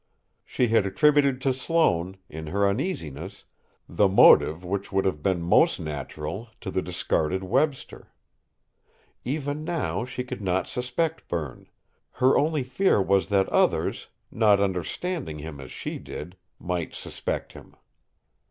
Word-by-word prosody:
She 125 Hz, -2 st, 0 dB
had 110 Hz, -3 st, +3 dB
attributed 140 Hz, +6 st, +3 dB
to 135 Hz, -1 st, +2 dB
Sloane, 95 Hz, -, +1 dB
in 80 Hz, +1 st, -8 dB
her 100 Hz, +4 st, +1 dB
uneasiness, 100 Hz, -, -4 dB, 0.4 s
the 105 Hz, -, +3 dB
motive 90 Hz, -3 st, +6 dB
which 95 Hz, +2 st, -3 dB
would 95 Hz, 0 st, +1 dB
have 75 Hz, -6 st, -1 dB
been 90 Hz, 0 st, 0 dB
most 85 Hz, -, +4 dB
natural 75 Hz, -, -5 dB
to -, -, -5 dB
the 95 Hz, -, 0 dB
discarded 90 Hz, 0 st, -1 dB
Webster. 135 Hz, +8 st, -1 dB, 1.1 s
Even 145 Hz, +2 st, -3 dB
now, 165 Hz, -6 st, -2 dB
she 125 Hz, 0 st, -5 dB
could 125 Hz, -, -7 dB
not 95 Hz, -1 st, 0 dB
suspect 140 Hz, +7 st, -2 dB
Berne; 75 Hz, -7 st, -5 dB, 0.5 s
her 130 Hz, +1 st, +3 dB
only 150 Hz, -1 st, +1 dB
fear 130 Hz, -, +2 dB
was 95 Hz, 0 st, +2 dB
that 100 Hz, -1 st, +2 dB
others, -, -, +1 dB, 0.2 s
not 105 Hz, -3 st, +4 dB
understanding 100 Hz, -, -2 dB
him 75 Hz, -1 st, -8 dB
as 65 Hz, -, -10 dB
she -, -, -5 dB
did, 90 Hz, +5 st, -8 dB, 0.2 s
might 90 Hz, -2 st, -3 dB
suspect -, -, -5 dB
him! -, -, -14 dB
100 Hz, 135 wpm, -26 LUFS, 90-130 Hz, 1.1 s, motive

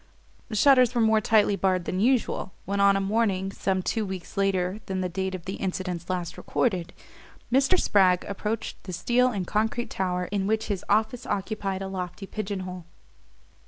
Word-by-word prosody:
The 220 Hz, -, -4 dB
shutters 255 Hz, 0 st, +5 dB
were 235 Hz, -, +3 dB
more 220 Hz, -1 st, +4 dB
tightly 210 Hz, -2 st, +3 dB
barred 185 Hz, -2 st, +1 dB
than 185 Hz, -, -2 dB
usual, 235 Hz, -5 st, +1 dB
when, 200 Hz, +2 st, -2 dB
on 200 Hz, 0 st, +5 dB
a -, -, +1 dB
morning 195 Hz, -2 st, 0 dB
some 190 Hz, -1 st, -1 dB
two 220 Hz, +3 st, 0 dB
weeks 190 Hz, -3 st, -6 dB
later 195 Hz, 0 st, 0 dB
than 190 Hz, -1 st, -2 dB
the 185 Hz, -, 0 dB
date 190 Hz, +1 st, -2 dB
of 180 Hz, -2 st, -9 dB
the 190 Hz, -, -4 dB
incidents 180 Hz, -2 st, -3 dB
last 180 Hz, -2 st, -3 dB
recorded, 185 Hz, -8 st, -1 dB, 0.6 s
Mr. 275 Hz, +8 st, +4 dB
Spragg 185 Hz, -3 st, +3 dB
approached 210 Hz, +2 st, -4 dB
the 185 Hz, -, -6 dB
steel 240 Hz, +8 st, +2 dB
and 200 Hz, -7 st, -2 dB
concrete 225 Hz, +5 st, -1 dB
tower 180 Hz, -1 st, -1 dB
in 200 Hz, -1 st, 0 dB
which 220 Hz, +1 st, 0 dB
his 200 Hz, -2 st, -2 dB
office 220 Hz, +4 st, +1 dB
occupied 195 Hz, -1 st, -2 dB
a -, -, -4 dB
lofty 185 Hz, 0 st, -5 dB
pigeon 200 Hz, -1 st, -4 dB
hole. 180 Hz, -2 st, -7 dB
195 Hz, 180 wpm, -26 LUFS, 185-220 Hz, 0.6 s, shutters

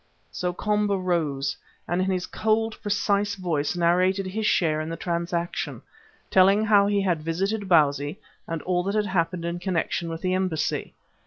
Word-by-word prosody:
So 180 Hz, -1 st, -2 dB
Komba 210 Hz, +1 st, 0 dB
rose, 155 Hz, -7 st, -1 dB, 0.3 s
and 175 Hz, +2 st, 0 dB
in 190 Hz, -, 0 dB
his 185 Hz, -1 st, -1 dB
cold, 220 Hz, 0 st, 0 dB
precise 205 Hz, 0 st, 0 dB
voice 165 Hz, -5 st, -1 dB
narrated 180 Hz, +3 st, +2 dB
his 210 Hz, +3 st, -2 dB
share 155 Hz, -4 st, +2 dB
in 155 Hz, -, -5 dB
the 165 Hz, -, -4 dB
transaction, 170 Hz, 0 st, -3 dB, 0.5 s
telling 195 Hz, +3 st, +5 dB
how 205 Hz, -2 st, +5 dB
he 205 Hz, -1 st, +2 dB
had 175 Hz, -5 st, 0 dB
visited 195 Hz, +6 st, -2 dB
Bausi, 145 Hz, -3 st, +3 dB, 0.3 s
and 165 Hz, -2 st, -4 dB
all 180 Hz, -1 st, +1 dB
that 200 Hz, +2 st, -1 dB
had 210 Hz, -1 st, +2 dB
happened 170 Hz, -2 st, -1 dB
in 170 Hz, +1 st, -3 dB
connection 175 Hz, -2 st, -1 dB
with 165 Hz, 0 st, -5 dB
the 185 Hz, 0 st, +1 dB
embassy. 185 Hz, -4 st, -1 dB
180 Hz, 165 wpm, -25 LUFS, 165-200 Hz, 0.5 s, telling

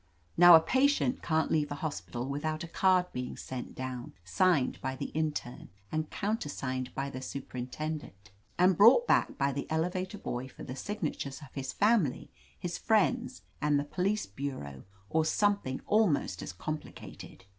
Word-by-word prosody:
Now, 175 Hz, 0 st, +10 dB
a -, -, +9 dB
patient 260 Hz, -, +2 dB
can't 160 Hz, -1 st, 0 dB
leave 150 Hz, -2 st, +1 dB
a -, -, -2 dB
hospital 140 Hz, -5 st, -4 dB
with 140 Hz, +2 st, -4 dB
out 155 Hz, +1 st, -2 dB
a -, -, -6 dB
card 185 Hz, +1 st, +3 dB
being 125 Hz, 0 st, -4 dB
sent 130 Hz, -1 st, -6 dB
down, 130 Hz, -2 st, -5 dB
signed 140 Hz, -, +2 dB
by 130 Hz, 0 st, -2 dB
the -, -, -5 dB
in 155 Hz, 0 st, +1 dB
terne 125 Hz, -4 st, -7 dB, 0.2 s
and 155 Hz, 0 st, -2 dB
countersigned 145 Hz, -, -3 dB
by 140 Hz, +1 st, -2 dB
the 130 Hz, -, -6 dB
superintendent, 130 Hz, -5 st, -6 dB, 0.3 s
and 180 Hz, +1 st, +5 dB
brought 235 Hz, -, +7 dB
back -, -, +2 dB
by 140 Hz, 0 st, +1 dB
the 140 Hz, +1 st, -4 dB
elevator 180 Hz, +5 st, -1 dB
boy 125 Hz, -8 st, -4 dB
for -, -, -11 dB
the 130 Hz, -, -6 dB
signatures 155 Hz, -6 st, -4 dB
of 135 Hz, -, -14 dB
his 135 Hz, -1 st, -4 dB
family, 205 Hz, -, +2 dB, 0.3 s
his 175 Hz, -1 st, -4 dB
friends 245 Hz, +4 st, +1 dB, 0.2 s
and 150 Hz, -1 st, +3 dB
the -, -, -1 dB
police 195 Hz, +7 st, -1 dB
bureau, 100 Hz, -, -6 dB, 0.2 s
or 160 Hz, +8 st, +2 dB
something 200 Hz, -6 st, +1 dB
almost 185 Hz, -, +2 dB
as -, -, -5 dB
compli 150 Hz, -, -5 dB
cated. -, -, -11 dB
155 Hz, 165 wpm, -30 LUFS, 130-185 Hz, 0.3 s, Now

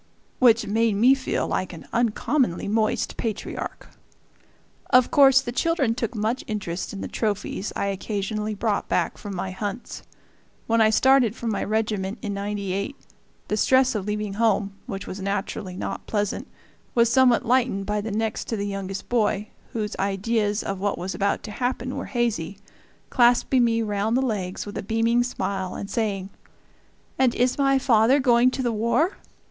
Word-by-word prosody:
which 230 Hz, -3 st, +5 dB
made 220 Hz, 0 st, +1 dB
me 240 Hz, +6 st, +6 dB
feel 270 Hz, -1 st, -1 dB
like 185 Hz, -1 st, -2 dB
an 165 Hz, -, -11 dB
uncommonly 235 Hz, -, +1 dB
moist 215 Hz, +1 st, 0 dB
patriarch. 220 Hz, -3 st, -4 dB, 1.0 s
Of 255 Hz, -2 st, +5 dB
course 270 Hz, -2 st, +6 dB
the 240 Hz, -, -5 dB
children 275 Hz, -2 st, +1 dB
took 235 Hz, 0 st, -3 dB
much 220 Hz, +4 st, -1 dB
interest 190 Hz, -5 st, -4 dB
in 200 Hz, -, -6 dB
the -, -, -4 dB
trophies 210 Hz, -2 st, -2 dB
I -, -, -1 dB
occasionally 210 Hz, +2 st, -2 dB
brought 210 Hz, 0 st, -1 dB
back -, -, 0 dB
from 205 Hz, -2 st, -6 dB
my 185 Hz, +1 st, -3 dB
hunts. 205 Hz, +4 st, -5 dB, 0.6 s
When 230 Hz, 0 st, +2 dB
I 215 Hz, -, +6 dB
started 250 Hz, 0 st, +4 dB
for -, -, -8 dB
my 220 Hz, -3 st, -1 dB
regiment, 215 Hz, -1 st, -1 dB
in 205 Hz, -2 st, -2 dB
'98, 200 Hz, +2 st, -3 dB, 0.5 s
the 210 Hz, -, 0 dB
stress 260 Hz, +4 st, +4 dB
of 210 Hz, -3 st, -3 dB
leaving 210 Hz, -1 st, -2 dB
home, 205 Hz, -2 st, +1 dB
which 195 Hz, -1 st, -5 dB
was 190 Hz, -, -7 dB
naturally 195 Hz, -1 st, -3 dB
not -, -, -5 dB
pleasant, 205 Hz, -2 st, -2 dB, 0.5 s
was 235 Hz, -1 st, +5 dB
somewhat 255 Hz, -1 st, +4 dB
lightened 240 Hz, -5 st, +1 dB
by 210 Hz, +1 st, -1 dB
the 220 Hz, -, -4 dB
next 220 Hz, +1 st, -2 dB
to 225 Hz, -, -2 dB
the 200 Hz, -, -2 dB
youngest 195 Hz, -1 st, -5 dB
boy, 215 Hz, -3 st, 0 dB, 0.2 s
whose 215 Hz, -2 st, -3 dB
ideas 205 Hz, +2 st, 0 dB
of 195 Hz, -1 st, -3 dB
what 200 Hz, +1 st, -1 dB
was 185 Hz, +2 st, -4 dB
about 200 Hz, 0 st, 0 dB
to 215 Hz, -, -7 dB
happen 250 Hz, +2 st, -2 dB
were -, -, -4 dB
hazy, 215 Hz, -7 st, -1 dB, 0.5 s
clasping 245 Hz, +1 st, +4 dB
me 230 Hz, -1 st, +2 dB
round 210 Hz, +2 st, 0 dB
the -, -, +2 dB
legs 190 Hz, -6 st, -3 dB
with 205 Hz, -, -6 dB
a -, -, -2 dB
beaming 225 Hz, +3 st, +2 dB
smile 200 Hz, -6 st, -3 dB
and 200 Hz, -, -6 dB
saying, 200 Hz, -4 st, -2 dB, 0.9 s
"And 255 Hz, -3 st, +3 dB
is 250 Hz, +3 st, +1 dB
my 275 Hz, -1 st, +4 dB
father 255 Hz, +1 st, +4 dB
going 245 Hz, -2 st, +4 dB
to 260 Hz, +1 st, -3 dB
the 240 Hz, -, +1 dB
war? 235 Hz, -, +1 dB
215 Hz, 170 wpm, -24 LUFS, 200-240 Hz, 1.0 s, me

